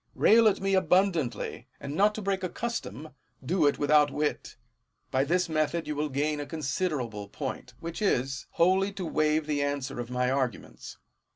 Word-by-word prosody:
Rail 225 +1 +6
at 210 - +2
me 195 0 0
abundantly; 185 -7 +1
and, 140 - -6
not 205 +6 +3
to 215 - -5
break 195 -1 -1
a 185 - -1
custom, 155 - -5 0.4
do 165 0 +2
it 145 - +1
without 150 0 +4
wit: 150 +1 -2 0.6
by 130 +1 +2
this 180 +5 +1
method 160 +1 0
you 150 - -2
will 150 +1 -1
gain 145 +2 -1
a 145 - -5
considerable 135 - -3
point, 125 +1 -6
which 170 +3 -6
is, 135 -8 0
wholly 190 +3 +3
to 190 -2 -5
waive 155 -1 +1
the 145 -1 -1
answer 140 -2 -2
of 120 -1 -5
my 125 0 0
arguments. 130 -3 -3
150 Hz, 175 wpm, -28 LUFS, 135-185 Hz, 0.6 s, Rail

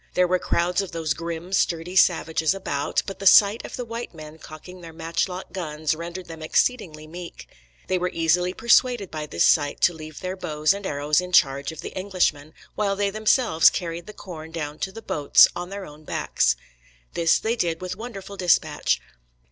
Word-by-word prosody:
There 180 0 +4
were 185 +1 +1
crowds 175 +3 0
of 195 -4 -7
those 160 -2 -1
grim, 170 +3 -6
sturdy 175 -1 0
savages 165 -1 +3
about; 145 -7 -2
but 195 - -7
the 195 - +1
sight 205 +3 +6
of - - -7
the 245 - -5
white 230 -4 -6
men 155 0 -11
cocking 175 +4 -11
their 165 -1 -10
matchlock 170 +3 -3
guns 155 -4 -2
rendered 170 +3 -7
them 165 -1 -10
exceedingly 155 -3 0
meek. 170 +2 -10 0.4
They 185 - 0
were 180 +1 -1
easily 175 +2 +1
persuaded 235 -1 +2
by 155 -1 -5
this 85 - +1
sight 145 -2 +3
to 175 - +4
leave 155 -1 -10
their 185 0 -4
bows 155 -2 0
and 200 -1 -5
arrows 145 +3 +1
in 180 0 -8
charge 140 -2 +3
of 160 - -9
the - - -8
Englishmen, 180 -6 -1 0.2
while 200 -2 0
they 200 0 0
themselves 215 -4 +4
carried 170 -1 -5
the 210 - -9
corn 160 -6 -9
down 155 -2 -5
to 190 - -3
the 225 +3 -10
boats 145 -2 +5
on 175 0 -5
their 200 0 -6
own 150 +1 -13
backs. - - 0 0.6
This 165 -1 +3
they 225 +2 -1
did 170 -7 -1
with 185 0 -5
wonderful 200 -3 -8
dispatch. 180 -2 +2
175 Hz, 190 wpm, -24 LUFS, 155-190 Hz, 0.6 s, sight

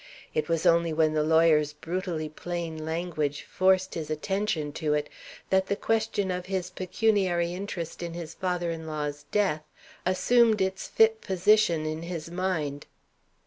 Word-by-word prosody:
It 155 +1 -1
was 165 -1 0
only 170 0 +4
when 155 0 +2
the 155 - +2
lawyer's 155 -1 +4
brutally 165 0 -3
plain 165 0 -5
language 160 -3 -2
forced 185 0 +2
his 160 -2 -4
attention 155 -1 -1
to 150 -1 +2
it 150 - -2 0.4
that 190 0 +3
the 200 - 0
question 220 -3 0
of 180 0 -4
his 185 -2 -2
pecuniary 185 -3 +1
interest 180 -4 -5
in 170 -1 -5
his 170 -2 -6
father 180 -2 -1
in 160 -1 -6
law's 150 -1 -4
death 195 -7 +1 0.4
assumed 220 +4 +4
its 190 0 -1
fit 220 0 +3
position 185 -3 +3
in 155 +1 -3
his 170 -1 -6
mind. 160 -6 -2
170 Hz, 150 wpm, -27 LUFS, 155-190 Hz, 0.4 s, only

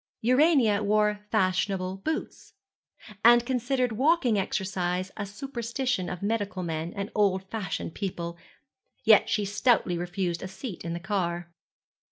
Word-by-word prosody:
Urania 255 -4 +4
wore 210 0 +1
fashionable 185 -2 0
boots, 310 +11 -5 0.7
and 240 0 +7
considered 250 0 0
walking 265 0 +2
exercise 185 -2 -1
a 205 -2 -4
superstition 235 -1 -3
of 180 +1 -6
medical 205 -3 -1
men 165 0 -3
and 200 +1 -4
old 195 -3 +2
fashioned 185 -7 -4
people; 170 -4 -4 0.7
yet - - +6
she 210 - +1
stoutly 205 -3 +2
refused 175 -1 -2
a 190 - -4
seat 190 +2 -7
in 170 0 -3
the 170 - -3
car. 175 -3 -2
200 Hz, 130 wpm, -27 LUFS, 185-235 Hz, 0.7 s, and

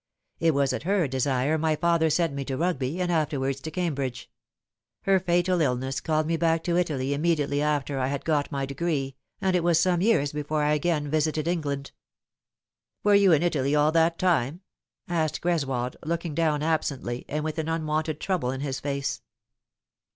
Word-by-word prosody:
It 165 -3 +2
was 140 -1 +2
at - - -3
her 185 -1 +1
desire 135 +3 0
my 160 0 +1
father 170 0 +2
sent 165 -1 +1
me 140 0 -3
to 130 -1 -3
Rugby, 165 -2 -1
and 180 -1 0
afterwards 140 -4 0
to 160 - -5
Cambridge. 140 -8 -3 0.7
Her 195 -1 +4
fatal 175 0 +1
illness 130 -1 -1
called 155 -1 0
me 165 +1 0
back 165 0 +1
to 170 - 0
Italy 140 -6 0
immediately 145 -2 +1
after 145 -2 0
I 130 - +1
had 140 +1 -3
got 150 -3 0
my 140 -1 -1
degree, 140 -1 -2 0.3
&nd 190 -1 +3
it 175 - +1
was 170 -1 +4
some 175 0 +2
years 180 -10 +2
before 150 +1 -1
I 150 0 +2
again 150 -1 0
visited 155 +1 0
England." 145 -5 -2 0.6
" - - -63
Were 205 - +4
you 200 -2 +6
in 160 0 +4
Italy 145 -4 +1
all 150 +1 +4
that 165 +1 +3
time 165 -3 +1 0.3
?" - - -66
asked 160 -3 -1
Greswold, 135 -8 -1
looking 170 0 -2
down 155 -2 +1
absently, 140 -6 -1
and 150 +1 -2
with 155 +1 -3
an 160 0 -2
unwonted 155 -1 -1
trouble 180 -10 -1
in 130 +1 -3
his 135 -2 -3
face. 140 -1 -3
155 Hz, 185 wpm, -26 LUFS, 140-170 Hz, 0.7 s, you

